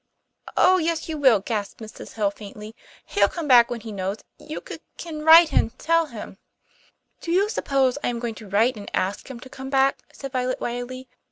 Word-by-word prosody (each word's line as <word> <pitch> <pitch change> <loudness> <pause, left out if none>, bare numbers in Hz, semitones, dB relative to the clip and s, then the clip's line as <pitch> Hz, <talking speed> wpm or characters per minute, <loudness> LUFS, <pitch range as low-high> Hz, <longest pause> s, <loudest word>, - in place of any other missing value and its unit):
"Oh, 370 0 +5
yes, 330 -1 -1
you 320 - -3
will," 260 -9 +4
gasped 205 -1 -4
Mrs. 220 -1 -10
Hill 205 -3 0
faintly. 210 +1 -11 0.3
"He'll 200 0 +2
come 325 - -5
back 240 -3 +7
when 240 -2 -5
he 220 0 -8
knows 195 0 -3 0.2
you 305 +1 -7
c - - -7 0.2
can 310 -3 -7
write 320 -1 +8
and 250 -1 +1
tell 330 0 +2
him 215 -6 -9 0.4
" - - -37
"Do 335 - -4
you 390 +4 +2
suppose 270 - 0
I - - 0
am 240 - -2
going 235 -1 -4
to 210 - -11
write 220 +5 +2
and 205 - -8
ask 195 +7 -2
him 255 -3 -8
to 260 - -10
come 265 +1 -8
back?" 270 0 +2
said 275 -1 -8
Violet 255 -1 -1
wildly. 245 +2 -5
255 Hz, 205 wpm, -24 LUFS, 215-305 Hz, 0.4 s, write